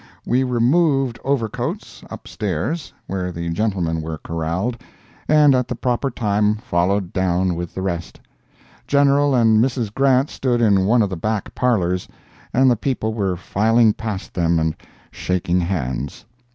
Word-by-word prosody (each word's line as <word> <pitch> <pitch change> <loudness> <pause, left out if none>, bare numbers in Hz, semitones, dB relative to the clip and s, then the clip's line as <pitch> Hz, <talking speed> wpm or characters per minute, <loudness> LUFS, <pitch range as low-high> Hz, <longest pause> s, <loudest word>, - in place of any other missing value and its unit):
We 125 +2 +2
removed 130 +1 +2
overcoats, 130 -6 -3
up - - -9
stairs, 130 - -3
where 90 -1 -3
the 85 -1 -4
gentlemen 85 -4 -1
were 80 0 -5
corralled, 85 +10 -3 0.5
and 150 -2 +5
at 125 -1 +1
the 125 - -3
proper 125 +3 -1
time 105 -3 +1
followed 100 -4 -1
down 95 0 +1
with 85 0 -6
the 95 - -3
rest. 85 -3 -4 0.7
General 140 0 +3
and 110 -2 +4
Mrs. 120 -5 -2
Grant 135 +1 +2
stood 125 -3 0
in 100 -5 +3
one 115 +1 +4
of 100 - -2
the - - -2
back 105 +4 -3
parlors, 90 -8 0 0.4
and 130 +2 +4
the - - +3
people 110 -2 -2
were 95 -5 -1
filing 110 +5 +2
past 105 -4 -5
them 85 -1 +1
and 80 0 +1 0.4
shaking 90 -1 -1
hands. 70 -7 -3
105 Hz, 150 wpm, -20 LUFS, 90-125 Hz, 0.7 s, and